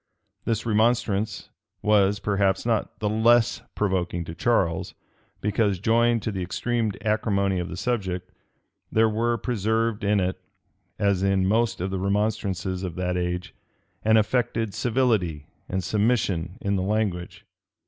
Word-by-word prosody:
[] -, -, -48 dB
This 115 Hz, 0 st, -1 dB
remonstrance 110 Hz, -2 st, +1 dB, 0.3 s
was, 105 Hz, -1 st, +4 dB
perhaps, 100 Hz, -1 st, +1 dB
not 115 Hz, -3 st, -1 dB
the 105 Hz, -, -1 dB
less 115 Hz, +2 st, +3 dB
provoking 90 Hz, -4 st, -1 dB
to 80 Hz, -, -7 dB
Charles, 85 Hz, -4 st, 0 dB, 0.5 s
because, 105 Hz, -1 st, +1 dB
joined 115 Hz, +3 st, +2 dB
to 110 Hz, -, -1 dB
the 95 Hz, -2 st, -4 dB
extreme 115 Hz, +4 st, -1 dB
acrimony 100 Hz, -3 st, +1 dB
of 90 Hz, -, -3 dB
the 90 Hz, -, -6 dB
subject, 95 Hz, -5 st, -2 dB, 0.6 s
there 110 Hz, 0 st, +4 dB
were 115 Hz, +2 st, 0 dB
preserved 110 Hz, -1 st, -1 dB
in 105 Hz, 0 st, +3 dB
it, 95 Hz, 0 st, -1 dB, 0.6 s
as 100 Hz, -2 st, +1 dB
in 95 Hz, -1 st, +2 dB
most 110 Hz, +4 st, +1 dB
of 95 Hz, +1 st, -2 dB
the 95 Hz, -, -2 dB
remonstrances 95 Hz, -2 st, -1 dB
of 90 Hz, -4 st, -4 dB
that 90 Hz, 0 st, -1 dB
age, 90 Hz, 0 st, -2 dB, 0.5 s
an 110 Hz, +1 st, +5 dB
affected 115 Hz, -1 st, 0 dB
civility 110 Hz, -, 0 dB, 0.2 s
and 95 Hz, 0 st, -1 dB
submission 100 Hz, -4 st, 0 dB
in 100 Hz, 0 st, 0 dB
the -, -, 0 dB
language. 95 Hz, -3 st, -2 dB
100 Hz, 140 wpm, -25 LUFS, 95-110 Hz, 0.6 s, an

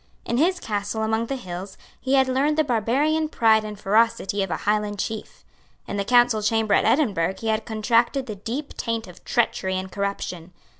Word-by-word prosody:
In 235 Hz, -, -1 dB
his 355 Hz, +6 st, +2 dB
castle 210 Hz, +1 st, -3 dB
among 220 Hz, +1 st, 0 dB
the 275 Hz, -, -2 dB
hills 190 Hz, -4 st, -7 dB, 0.2 s
he 265 Hz, +1 st, +1 dB
had 265 Hz, -1 st, +4 dB
learned 280 Hz, +4 st, +1 dB
the 310 Hz, -, +4 dB
barbarian 285 Hz, +6 st, +1 dB
pride 220 Hz, -5 st, +3 dB
and 210 Hz, -1 st, -7 dB
ferocity 215 Hz, -1 st, +2 dB
of 195 Hz, -, -2 dB
a -, -, -1 dB
Highland 210 Hz, 0 st, 0 dB
chief. 215 Hz, +2 st, -5 dB, 0.4 s
In -, -, -4 dB
the 200 Hz, -, 0 dB
Council 240 Hz, 0 st, +4 dB
Chamber 220 Hz, 0 st, +1 dB
at -, -, +3 dB
Edinburgh 195 Hz, -, +2 dB
he 225 Hz, +3 st, -3 dB
had 220 Hz, 0 st, 0 dB
contracted 235 Hz, +4 st, +1 dB
the 215 Hz, -4 st, -6 dB
deep 250 Hz, +9 st, -5 dB
taint 230 Hz, -1 st, -2 dB
of 180 Hz, -2 st, -14 dB
treachery 190 Hz, -5 st, 0 dB
and 185 Hz, 0 st, -5 dB
corruption. 190 Hz, -3 st, -4 dB
220 Hz, 190 wpm, -24 LUFS, 205-245 Hz, 0.4 s, had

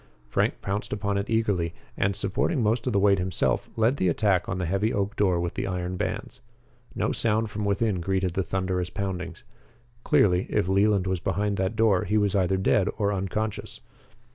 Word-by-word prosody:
Frank -, -, 0 dB
pounced 100 Hz, +2 st, -3 dB
upon 100 Hz, -1 st, -1 dB
it 100 Hz, -, -4 dB
eagerly, 100 Hz, -7 st, 0 dB, 0.2 s
and, 100 Hz, 0 st, 0 dB
supporting 105 Hz, -, 0 dB
most 115 Hz, +3 st, +1 dB
of 125 Hz, -, 0 dB
the -, -, +2 dB
weight 100 Hz, -1 st, +4 dB
himself, 90 Hz, -2 st, 0 dB
led 115 Hz, +5 st, +2 dB
the 95 Hz, -, +1 dB
attack 90 Hz, +1 st, +1 dB
on 95 Hz, -, -2 dB
the 90 Hz, -, -2 dB
heavy 100 Hz, +6 st, 0 dB
oak 100 Hz, 0 st, -1 dB
door 95 Hz, -4 st, +2 dB
with 85 Hz, 0 st, -2 dB
the -, -, -3 dB
iron 90 Hz, -1 st, -3 dB
bands. -, -, -4 dB, 0.5 s
No -, -, 0 dB
sound 110 Hz, -1 st, 0 dB
from 105 Hz, 0 st, -3 dB
within 100 Hz, -2 st, 0 dB
greeted 95 Hz, 0 st, 0 dB
the 95 Hz, -, 0 dB
thunderous 95 Hz, -1 st, -2 dB
poundings. 95 Hz, -3 st, -5 dB, 0.6 s
Clearly, 90 Hz, -2 st, +3 dB
if -, -, +1 dB
Leland 100 Hz, 0 st, +3 dB
was 95 Hz, -1 st, -1 dB
behind 100 Hz, +3 st, -1 dB
that 95 Hz, +3 st, -1 dB
door, 110 Hz, -4 st, +3 dB
he 105 Hz, +4 st, +1 dB
was 105 Hz, -1 st, +1 dB
either 95 Hz, 0 st, +2 dB
dead 95 Hz, +1 st, +2 dB
or 105 Hz, -2 st, +1 dB
unconscious. 100 Hz, +3 st, -3 dB
100 Hz, 190 wpm, -26 LUFS, 95-105 Hz, 0.6 s, weight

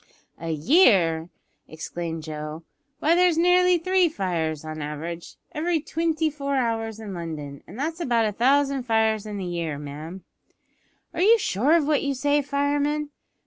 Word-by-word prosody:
"A 165 Hz, +1 st, -5 dB
year!" 165 Hz, -, +4 dB, 0.4 s
exclaimed 165 Hz, 0 st, -5 dB
Joe. 155 Hz, +1 st, -6 dB, 0.3 s
"Why, 315 Hz, +3 st, +2 dB
there's 355 Hz, -1 st, +4 dB
nearly 360 Hz, +1 st, +4 dB
three 370 Hz, +1 st, +2 dB
fires, 165 Hz, -, -2 dB
on 155 Hz, 0 st, -6 dB
the -, -, -4 dB
average, 165 Hz, +3 st, -6 dB, 0.2 s
every 330 Hz, 0 st, 0 dB
twinty 320 Hz, +1 st, -1 dB
four 280 Hz, -1 st, -3 dB
hours 225 Hz, -3 st, -1 dB
in 210 Hz, -3 st, -7 dB
London, 155 Hz, -5 st, -6 dB
an' -, -, -11 dB
that's 315 Hz, +7 st, -3 dB
about 240 Hz, -8 st, +1 dB
a 215 Hz, -, 0 dB
thousand 275 Hz, +4 st, +2 dB
fires 220 Hz, -3 st, +1 dB
in 210 Hz, -1 st, -5 dB
the 190 Hz, -, -4 dB
year, 170 Hz, -4 st, -3 dB
ma'am." 150 Hz, +6 st, -8 dB, 0.9 s
"Are 340 Hz, -, -2 dB
you 445 Hz, +5 st, +6 dB
sure 265 Hz, -, +1 dB
of 335 Hz, -3 st, +4 dB
what 300 Hz, -1 st, +2 dB
you 280 Hz, -1 st, -1 dB
say, 290 Hz, +2 st, +2 dB
fireman?" 285 Hz, +1 st, -1 dB
230 Hz, 160 wpm, -24 LUFS, -, 0.9 s, you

